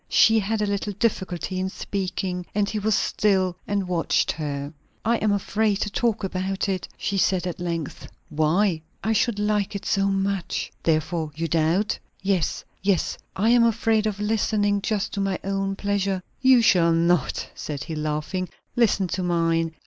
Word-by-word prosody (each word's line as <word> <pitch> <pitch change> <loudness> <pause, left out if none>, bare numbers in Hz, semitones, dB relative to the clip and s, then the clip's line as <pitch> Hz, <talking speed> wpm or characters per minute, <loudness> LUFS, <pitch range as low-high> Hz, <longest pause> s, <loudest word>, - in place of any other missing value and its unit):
She 225 0 +5
had 210 +1 -1
a - - +2
little 200 0 -2
difficulty 190 -4 -1
in 190 0 -1
speaking, 185 -2 -3
and 205 -1 +2
he 215 - -2
was 215 0 +2
still 190 -4 +1
and 200 -2 -1
watched 175 -2 +1
her. 145 -1 -4 0.3
"I 230 +1 +3
am 215 -1 +1
afraid 205 +1 +1
to 210 - -1
talk 230 -1 0
about 190 +1 -2
it," 190 -2 -2
she 200 0 -1
said 185 -1 +2
at 180 -1 -4
length, 170 -3 -4 0.2
"Why?" 160 +3 +2 0.2
"I 220 +2 +1
should 220 0 +1
like 210 -1 0
it 200 - -5
so 195 0 +2
much!" 195 -1 -1
"Therefore 160 0 0
you 165 +1 -2
doubt?" 165 +6 +1 0.2
"Yes. 190 -4 0 0.7
I 215 +4 +2
am 240 0 +6
afraid 225 -1 +2
of 205 -1 -3
listening 210 -1 +1
just 210 -1 -1
to 200 - -1
my 195 -1 0
own 195 0 -1
pleasure." 200 -2 -1 0.2
"You 260 -2 +6
shall 170 -6 +5
not," 170 -2 +1
said 145 -2 -5
he, 165 - -6
laughing. 155 +4 -2 0.3
"Listen 220 -5 +3
to 185 - -2
mine. 165 -2 +1
195 Hz, 165 wpm, -24 LUFS, 175-210 Hz, 0.7 s, am